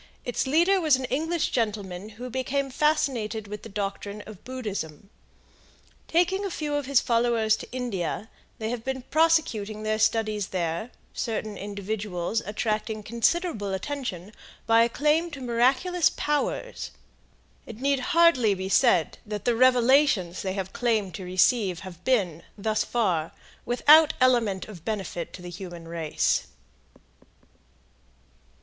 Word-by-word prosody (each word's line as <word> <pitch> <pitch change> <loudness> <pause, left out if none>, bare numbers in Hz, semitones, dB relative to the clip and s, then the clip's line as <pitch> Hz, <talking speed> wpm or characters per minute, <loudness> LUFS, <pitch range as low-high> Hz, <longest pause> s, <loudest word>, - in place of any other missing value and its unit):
Its 245 +2 -1
leader 345 +7 +4
was 310 -4 +5
an 260 0 -3
English 320 +4 0
gentleman 205 -4 -2
who 245 - -8
had 250 -1 -6
become 270 +1 -1
fascinated 255 -8 0
with 210 0 -7
the 225 - -10
doctrine 200 0 -4
of 215 -4 -12
Buddhism. 200 - -6 1.0
Taking 360 +4 +2
a 395 - -2
few 305 -4 -3
of 290 -2 -1
his 275 -2 +4
followers 230 -2 +2
to - - -10
India, 220 -6 -3 0.3
they 220 0 -3
have 240 -2 -4
been 260 0 -3
prosecuting 250 -10 +1
their 215 0 0
studies 215 -2 +1
there, 175 +4 -2 0.2
certain 220 -2 -3
individuals 200 0 -3
attracting 215 0 -2
considerable 235 - 0
attention 210 -6 -5 0.3
by 230 0 +5
a 230 - +3
claim 305 +6 +1
to 290 -3 -8
miraculous 260 +9 +2
powers. 295 +11 -2 0.8
It 225 - -9
need 275 +1 +1
hardly 335 - +4
be 190 0 -4
said 195 - +3
that 210 -3 -6
the 240 - +3
revelations 250 - +4
they 190 -1 -2
have 190 -1 -4
claimed 220 -6 0
to 185 - -6
receive 185 0 +2
have 180 -2 -10
been, 190 -11 +1 0.2
thus 215 +1 0
far, 180 -9 0 0.3
without 300 +5 +6
element 235 -7 +2
of 190 -7 -11
benefit 190 -5 -4
to 180 - -10
the 175 - -7
human 175 -2 -8
race. 165 -2 0
225 Hz, 140 wpm, -26 LUFS, 195-265 Hz, 1.0 s, without